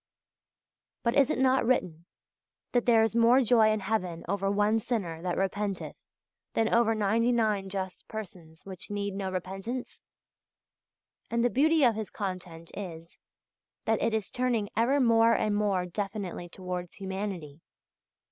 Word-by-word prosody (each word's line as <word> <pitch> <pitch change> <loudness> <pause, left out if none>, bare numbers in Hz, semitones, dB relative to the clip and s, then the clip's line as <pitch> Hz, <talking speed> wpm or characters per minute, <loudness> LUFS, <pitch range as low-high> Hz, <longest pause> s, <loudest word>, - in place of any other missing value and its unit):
But 235 - +2
is 275 -2 +5
it - - 0
not 260 0 +3
written 180 -9 0 0.6
that 245 -1 +1
"there 225 -2 +6
is 225 0 0
more 235 +3 +5
joy 225 -2 +5
in 215 -1 0
heaven 185 -5 -2
over 195 0 0
one 210 +2 +2
sinner 195 -9 -3
that 180 0 -2
repenteth 195 0 -2 0.6
than 225 0 +2
over 230 -1 +4
ninety 220 +3 +2
nine 215 -5 +1
just 190 -1 -5
persons 175 -7 -9
which 190 -2 -8
need 200 -1 -2
no 195 -1 -3
repentance"? 195 +7 -5 1.3
And 235 +1 +1
the 245 - +2
beauty 310 +3 +3
of 240 -3 +5
his 220 -2 -5
content 180 -4 -6
is, 170 -4 -8 0.7
that 220 -1 +1
it 225 -1 +1
is 215 -3 -3
turning 240 -5 0
ever 245 +6 +3
more 230 -2 +5
and 210 -1 +1
more 200 -3 +1
definitely 195 -1 -4
towards 180 -1 -6
humanity. 190 -6 -5
205 Hz, 145 wpm, -29 LUFS, 185-230 Hz, 1.3 s, there